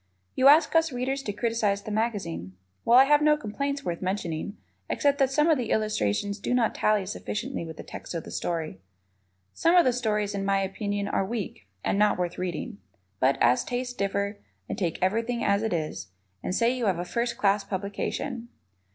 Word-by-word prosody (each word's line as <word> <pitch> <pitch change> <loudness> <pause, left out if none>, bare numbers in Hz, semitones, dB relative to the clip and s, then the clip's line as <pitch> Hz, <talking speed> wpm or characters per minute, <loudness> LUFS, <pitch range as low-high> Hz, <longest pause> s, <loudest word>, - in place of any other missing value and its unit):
You 260 - +4
ask 305 +3 +6
us 325 -1 +4
Readers 260 +2 -2
to 215 - -3
criticize 210 -1 0
the 215 - -6
magazine. 195 - -2 0.3
Well, 235 +2 +6
I 260 - +10
have 295 +2 +4
no 300 0 +5
complaints 280 +4 -3
worth 170 -1 -3
mentioning, 185 0 -3 0.3
except 285 -1 +1
that 270 -1 +4
some 300 +3 +2
of 315 -5 +4
the 235 -3 -3
illustrations 205 - 0
do 245 - 0
not 235 -3 +2
tally 210 -2 +2
sufficiently 210 +2 -4
with 160 -1 -8
the - - -7
text - - -8
of 165 - -3
the - - -10
story. 160 - -3 0.7
Some 335 +2 +3
of 350 - +7
the 255 - +3
stories, 210 -4 0
in 200 -1 -2
my 195 0 +2
opinion, 200 +1 -2
are 195 - +1
weak 195 - -5 0.2
and 200 - 0
not 210 0 +4
worth 175 -1 -2
reading. 175 - -4 0.4
But, 130 +1 +3
as 120 +1 +4
tastes 245 0 -3
differ, 200 -1 -2 0.3
I - - -3
take 170 -4 -2
everything 230 +5 0
as 200 0 +2
it 220 - -1
is, 155 - -3 0.3
and 185 - -2
say 235 +3 +2
you 245 -4 -1
have 185 -3 +2
a 175 - -3
first 235 +6 -2
class 200 0 +2
publication. 205 +5 -4
210 Hz, 195 wpm, -27 LUFS, 190-245 Hz, 0.7 s, I